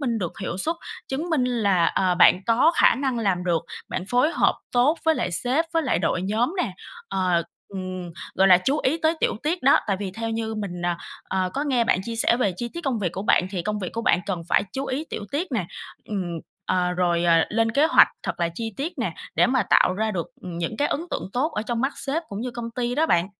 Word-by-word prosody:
minh 240 -5 0
được 175 -4 -3
hiệu 180 -1 -3
suất, 325 - 0 0.3
chứng 310 +6 -3
minh 285 -6 +2
là, 200 -9 +2
ờ, 185 -1 +1
bạn 180 +1 +6
có 255 +9 +4
khả - - +6
năng 265 -3 -1
làm 190 -5 0
được, 170 -2 +1 0.3
bạn 180 - -3
phối 250 +6 +3
hợp - - +3 0.2
tốt 265 +7 +3
với 320 0 +4
lại 180 - -1
sếp 255 - +1
với 330 -1 +2
lại 260 - +1
đội 180 - 0
nhóm 225 - 0
nè, - - -3 0.4
ờ, 180 -3 +1 0.3
ừm, 185 -2 -6 0.2
gọi 190 +1 +4
là, 180 -1 +8
chú 275 +11 0
ý 310 +5 +1
tới 320 +1 +3
tiểu - - +1
tiết 330 +2 -1
đó. 275 - +6
Tại 195 -2 +1
vì 195 -2 -3
theo 225 +3 -4
như 225 0 -2
mình, 185 -5 -5
ờ, 175 0 +1 0.3
ờ, 185 -1 0
có 280 - 0
nghe 250 -5 +2
bạn 185 - +2
chia 230 +2 -5
sẻ 235 - +3
về 205 -7 +1
chi 240 +3 -3
tiết 340 - -4
công 255 -5 0
việc 180 -4 -1
của 190 - -4
bạn, 185 - +3
thì 185 -4 -3
công 210 +2 -2
việc 185 -3 -4
của 230 - -3
bạn 185 - +3
cần 180 -4 -2
phải - - +3
chú 270 0 -3
ý 280 +5 -2
tiểu 205 - -4
tiết 325 +6 0
nè. 195 -8 -1 0.4
Ừm, 180 -5 -3 0.3
ờ, 180 -1 +1
rồi, 175 -1 +1
ờ, 170 -1 +5
lên 225 +1 +1
kế 295 +5 +4
hoạch 335 - +7
thật - - -4
là 170 - +2
chi 225 +1 -4
tiết 305 +6 -3
nè, - - -1 0.2
để - - +4
mà 260 0 +2
tạo 185 - +5
ra 220 +2 0
được, 175 -5 -3 0.2
ừm, 175 -2 -6
những 175 +6 -3
cái 290 - +1
ấn - - -1
tượng - - -3
tốt 290 +6 0
ở 210 - -1
trong 235 +1 -2
mắt 270 +2 0
sếp 290 +5 -2
cũng 200 +1 -5
như 250 - -3
công 235 -1 -6
ty 245 +1 -2
đó 315 +4 +2
bạn. 175 - +3
225 Hz, 255 wpm, -24 LUFS, 185-265 Hz, 0.4 s, là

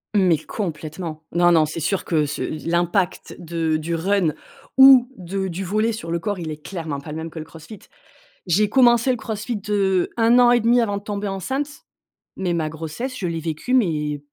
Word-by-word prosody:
Mais 185 -5 +4
complètement. 160 -2 -6
Non, 175 0 +4
non, 160 -2 +5
c'est 155 +2 -5
sûr 180 +5 -1
que 155 -3 +1
ce 150 +1 -5 0.3
l'impact 175 +2 0
de 165 -2 -1
du 165 +2 -3
run 180 -1 +1 0.4
ou 265 -2 +9
de 190 +1 -3
du 185 +2 -4
volley 215 +5 0
sur 165 -6 -6
le 170 - 0
corps, 205 +4 -3
il 160 -2 -5
est 150 0 -8
clairement 160 -6 -5
pas 150 +2 -9
le 155 - -5
même 160 +1 -5
que 160 - -8
le 155 - -7
CrossFit. 165 +6 -12 0.7
J'ai 205 +5 +3
commencé 240 +1 +4
le 250 - -1
CrossFit, 220 -1 -4
heu, 190 -3 +1
1 230 +2 +5
an 245 -1 +6
et 245 - +5
demi 240 +2 +4
avant 205 -3 -1
de 200 - -8
tomber 205 0 -4
enceinte, 265 +9 -2 0.7
mais 185 -2 -1
ma 160 -2 -1
grossesse 160 - -6
je 185 - -2
l'ai 165 -1 -3
vécue 160 +10 -4
mais 150 - +1
180 Hz, 200 wpm, -22 LUFS, 160-215 Hz, 0.7 s, ou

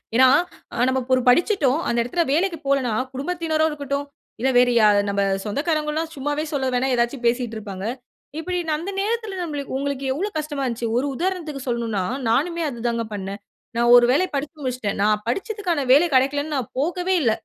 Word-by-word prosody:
ஏன்னா, 260 +2 +7 0.6
நம்ம 260 0 +1
ஒரு 255 - +4
படிச்சிட்டோம் 295 - +3
அந்த 235 - 0
இடத்துல 335 +9 0
வேலைக்கு 335 +3 +1
போலன்னா, 270 -4 +1 0.2
குடும்பத்தினரா 315 +2 0
இருக்கட்டும், 285 -1 -3 0.3
இல்ல 265 +3 +1
வேறு 245 0 +5
யா 215 - +6 0.2
நம்ம 200 0 0 0.2
சொந்தக்காரவங்கல்லாம் 305 +6 -1
சும்மாவே 290 +2 -2
சொல்ல 275 -2 0
வேணா, 250 +2 +1
ஏதாச்சும் 240 +2 -1
பேசிக்கிட்டு 235 -1 0
இருப்பாங்க. 200 -3 -6 0.5
இப்பிடி 360 +2 -2
அந்த 315 +5 -2
நேரத்துல 440 -1 -2
நம்மளுக் 290 -6 -4
உங்களுக்கு 275 0 -3
எவ்ளோ 375 +10 -2
கஷ்டமா 295 -2 -3
இருந்துச்சு. 235 -2 -2
ஒரு 255 - +1
உதாரணத்திற்கு 330 -5 -3
சொல்லணுன்னா, 230 -5 -1 0.3
நானுமே 335 +9 +1
அது 240 -4 -8
தான் 235 0 0
பண்னேன். 200 +1 -6 0.4
நான் 240 0 +4
ஒரு 240 0 +7
வேலை 325 +8 +3
படிச்சு 295 +3 -4
முடிச்சுட்டேன். 250 -6 -2
நான் 210 +1 +2
படிச்சதுக்கான 385 - -1
வேலை 290 +6 +7
கெடைக்கலன்னு 285 +3 +1
நான் 250 -5 -4
போகவே 355 +5 0
இல்ல 230 - +3
275 Hz, 165 wpm, -22 LUFS, 240-320 Hz, 0.6 s, ஏன்னா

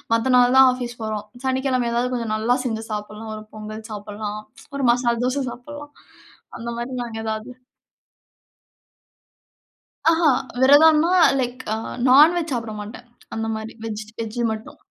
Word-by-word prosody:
மத்த 250 +3 +1
நாள் 245 +1 +4
தான் 265 0 +9
ஆஃபீஸ் 245 -1 -6
போறோம். 215 -1 -3 0.2
சனிக்கிழமை 260 -2 0
எதாவது 245 +2 0
கொஞ்சம் 230 -3 -2
நல்லா 230 +3 +1
செஞ்சு 225 -2 -2
சாப்பிடலாம், 210 +1 -6
ஒரு 215 - -8
பொங்கல் 215 +1 -8
சாப்பிடலாம். 210 0 -6 0.3
ஒரு 275 -2 -1
மசால் 240 -1 0
தோசை 265 +2 0
சாப்பிடலாம். 290 +3 -10 0.7
அந்த 235 +1 -5
மாதிரி 240 +2 -4
நாங்க 230 -2 -7
ஏதாவது 220 +2 -4 2.6
ஆஹா, 330 -1 +3 0.3
விரதம்ன்னா, 305 +4 +6 0.3
லைக் 250 0 -3 0.5
நான்வெஜ் 310 +5 +5
சாப்பிட 230 -2 -3
மாட்டேன். 220 +4 -9 0.3
அந்த 225 0 -2
மாரி 220 +1 -6
வெஜ் 215 -1 -4 0.2
வெஜ் 225 +1 -4
மட்டும். 220 0 -8
240 Hz, 135 wpm, -22 LUFS, 220-260 Hz, 2.6 s, தான்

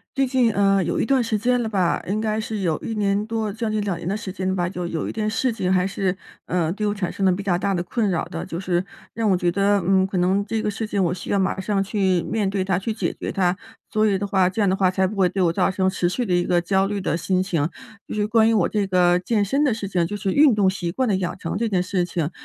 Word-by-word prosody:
最 270 0 +2
近， 250 -3 +2
呃， 195 -1 +3
有 170 0 -1
一 - - +1
段 265 0 +2
时 225 -2 0
间 245 +3 +1
了 225 - -2
吧。 185 -5 0
应 205 +3 -1
该 215 0 -1
是 215 -1 -4
有 170 -5 0
1 225 - -5
年 205 0 +1
多 220 -2 -2
将 225 0 -3
近 215 - 0
2 195 -4 -2
年 - - -7
的 200 - -1
时 210 -3 -6
间 185 0 -3
了 190 - 0
吧， 175 -2 0
就 180 -1 -4
有 165 -2 -3
一 - - -3
件 215 -1 -2
事 235 +3 0
情 185 -5 -1
还 185 -1 +3
是， 195 -1 -1 0.3
呃， 170 -3 0
对 210 +1 -2
我 205 - 0
产 185 -4 -3
生 195 - -3
了 190 - +5
比 185 +2 -2
较 185 -3 +1
大 195 +2 0
的 175 - -1
困 210 +4 -1
扰 175 -4 -1
的。 80 - -6
就 165 - -5
是 180 -1 0 0.3
让 225 -1 0
我 185 - +3
觉 175 -1 +1
得， 200 +2 +2
嗯， 190 0 +3
可 195 - -3
能 185 +3 +2
这 220 +2 -2
个 210 - 0
事 220 +1 -4
情 200 -2 0
我 175 -1 +1
需 180 - -8
要 200 - +2
马 190 0 0
上 195 0 0
去 190 -4 +1
面 210 -1 -1
对 195 -1 -1
它， 190 -1 0
去 225 +4 -3
解 - - -2
决 - - -5
它。 185 -2 +1 0.4
所 215 0 +2
以 200 -2 +2
的 200 - -3
话， 190 -2 +2
这 185 - -6
样 205 - +3
的 190 - +2
话 190 -1 +2
才 190 +1 +1
不 195 +3 -3
会 190 -2 +3
对 190 0 0
我 165 -1 +2
造 185 +1 +2
成 190 0 0
持 185 -2 0
续 245 +7 -2
的 185 - -1
一 175 0 +3
个 175 -1 +2
焦 190 +2 +1
虑 205 0 -2
的 190 - -1
心 185 +2 0
情。 165 -5 -1 0.4
就 - - -5
是 210 -1 +1
关 220 +1 +4
于 - - +3
我 195 -5 +3
这 205 -2 -1
个 180 -1 +3
健 205 +2 0
身 275 +9 +1
的 285 - +3
事 215 -3 -3
情， 175 -3 0
就 205 - -4
是 195 -1 -1
运 285 -5 +5
动 205 -2 +3
习 185 -2 -1
惯 260 +7 0
的 205 - +2
养 180 -2 -3
成 165 -3 -4
这 230 +1 0
件 185 -3 +1
事 185 0 0
情。 170 -2 -2
195 Hz, 325 characters per minute, -22 LUFS, 180-215 Hz, 0.4 s, 了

